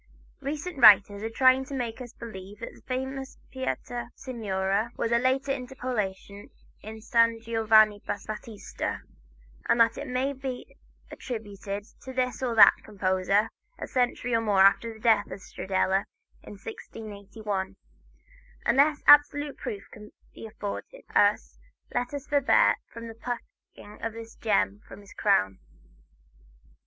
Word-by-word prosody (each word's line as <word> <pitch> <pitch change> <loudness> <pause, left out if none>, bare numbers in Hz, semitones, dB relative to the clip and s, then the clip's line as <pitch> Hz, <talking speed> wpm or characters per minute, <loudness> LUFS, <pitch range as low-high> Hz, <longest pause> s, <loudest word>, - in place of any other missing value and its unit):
Recent 295 +3 -5
writers 205 -3 +7
are 225 - -3
trying 260 +3 +4
to 280 0 -6
make 240 -1 -4
us 240 -2 -8
believe 200 -3 -9
that - - -6
the - - -18
famous 265 +1 -4 0.2
"Pietà 245 -2 -4
Signore" 205 -3 -2
was 230 - -1
a 235 - +4
later 265 +2 +1
interpolation 245 -7 -4 0.3
in 220 +1 -9
"San 230 0 +3
Giovanni 220 -2 +4
Battista," 215 +1 -5 0.7
and 235 - +3
that 230 0 +4
it - - -6
may 260 +3 -1
be 265 -2 -7 0.4
attributed 205 -4 -6 0.2
to 260 - -8
this 255 0 -1
or 245 -3 -1
that 220 - +8
composer, 195 +1 0 0.3
a - - -5
century 245 -1 0
or 230 - +3
more 205 -3 +4
after 200 +4 +4
the 220 - -13
death 225 0 +3
of 195 - -7
Stradella, 190 +1 -1 0.4
in - - -11
1681. 205 -1 -6 0.9
Unless 290 +2 +3
absolute 290 0 +6
proof 210 -6 -5 0.5
be 225 - -9
afforded 220 - -7
us, - - +2 0.3
let 245 0 -1
us 285 -2 -6
forbear 285 -2 +4 0.2
from 230 -1 -8
plucking 235 -3 -8
this 230 0 -9
gem 205 -1 0
from - - -11
his 200 - -15
crown. 95 0 +1
225 Hz, 130 wpm, -27 LUFS, 205-255 Hz, 0.9 s, that